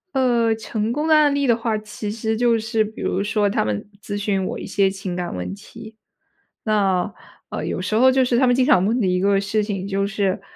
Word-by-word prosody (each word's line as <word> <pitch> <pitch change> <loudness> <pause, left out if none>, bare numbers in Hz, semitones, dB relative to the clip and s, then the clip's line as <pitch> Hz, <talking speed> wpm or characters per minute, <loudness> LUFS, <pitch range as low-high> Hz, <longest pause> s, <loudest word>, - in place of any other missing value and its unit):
呃， 240 -3 +3
成 220 0 -3
功 300 +5 -1
的 315 - +5
案 295 -2 +4
例 280 -1 0
的 235 - +4
话， 225 -2 -1
其 210 0 -6
实 220 0 -2
就 235 0 +2
是 220 0 0
比 215 +1 -8
如 195 +2 -1
说 210 -1 +1
他 - - 0
们 105 - -3
咨 205 -1 -4
询 195 -2 -1
我 - - -4
一 - - -7
些 195 -1 +2
情 190 -2 -5
感 180 -1 -4
问 90 +1 -4
题。 220 - -12 0.7
那， 195 -4 +1 0.4
呃， - - -4
有 - - -3
时 215 - -2
候 260 +3 +6
就 260 0 +3
是 245 -1 +1
他 260 - +4
们 245 - +4
经 255 -1 +3
常 185 -6 +4
问 230 +5 +1
的 200 - +1
一 180 0 +1
个 200 0 +3
事 210 +2 0
情， 200 -2 -4
就 195 0 0
是， 200 -1 -1
215 Hz, 255 characters per minute, -21 LUFS, 195-235 Hz, 0.7 s, 候